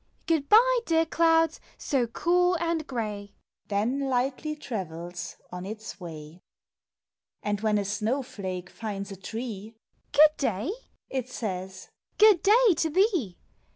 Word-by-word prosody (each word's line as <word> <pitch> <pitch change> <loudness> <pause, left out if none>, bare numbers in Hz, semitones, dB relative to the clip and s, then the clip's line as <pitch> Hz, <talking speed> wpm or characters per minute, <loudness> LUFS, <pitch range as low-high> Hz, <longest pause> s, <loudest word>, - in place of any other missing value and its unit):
Good 315 -5 0
bye, - - +6
dear 325 0 +3
clouds, 325 -1 +3 0.2
so 260 -5 0
cool 355 +8 +2
and 330 -2 -1
gray! 210 -5 -4 0.2
" - - -51
Then 245 +7 0
lightly 265 +4 -1
travels 175 - -6 0.2
on 180 0 -6
its 215 +1 -7
way. 160 -1 -9 1.0
And 205 -1 -1
when 215 -1 +2
a 200 - -1
snow 220 +7 -1
flake 185 -6 -6
finds 200 -3 -5
a - - -6
tree, 220 +2 -6 0.4
"Good 305 +1 +6
day!" 230 - -1 0.4
it 255 -2 -3
says 190 -5 -5
— - - -48
"Good 420 -5 +7
day 440 +1 +5
to 325 -1 +1
thee! 345 - +1
240 Hz, 140 wpm, -27 LUFS, 200-320 Hz, 1.0 s, Good